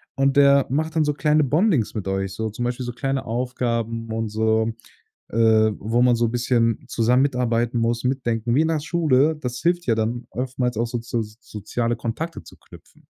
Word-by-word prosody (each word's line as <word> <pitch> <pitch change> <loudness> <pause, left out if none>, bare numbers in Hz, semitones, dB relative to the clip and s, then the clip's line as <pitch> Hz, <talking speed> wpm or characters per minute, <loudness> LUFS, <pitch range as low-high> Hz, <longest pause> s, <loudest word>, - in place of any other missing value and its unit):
Und 135 0 +2
der 140 -1 +6
macht 160 +4 -1
dann 160 - +3
so 150 - +1
kleine 150 +1 +2
Bondings 150 - +1
mit 105 -3 -5
euch 95 0 -2
so 110 +2 -3
zum 120 +3 -4
Beispiel 125 +1 -3
so 120 - -3
kleine 135 +1 -2
Aufgaben 115 -2 -2
und 115 0 -2
so, 110 +1 +1 0.6
äh, - - -6 0.4
wo 115 +3 0
man 125 -1 +4
so 115 0 +1
bisschen 120 -1 0
zusammen 125 +3 +2
mitarbeiten 120 -3 0
muss, 115 +1 0
mitdenken 120 -3 -1
wie 145 - +4
in 160 - +1
der 160 -2 0
Schule. 155 -2 +2
Das 125 -2 -4
hilft 175 0 0
ja 115 - +3
dann 115 +2 -2
oftmals 125 -1 -2
auch 115 +2 0
so 120 +1 -3
zu 115 0 -3
soziale 110 +2 -4
Kontakte 120 +9 -5
zu - - -15
knüpfen. - - -18
120 Hz, 190 wpm, -22 LUFS, 115-135 Hz, 0.6 s, der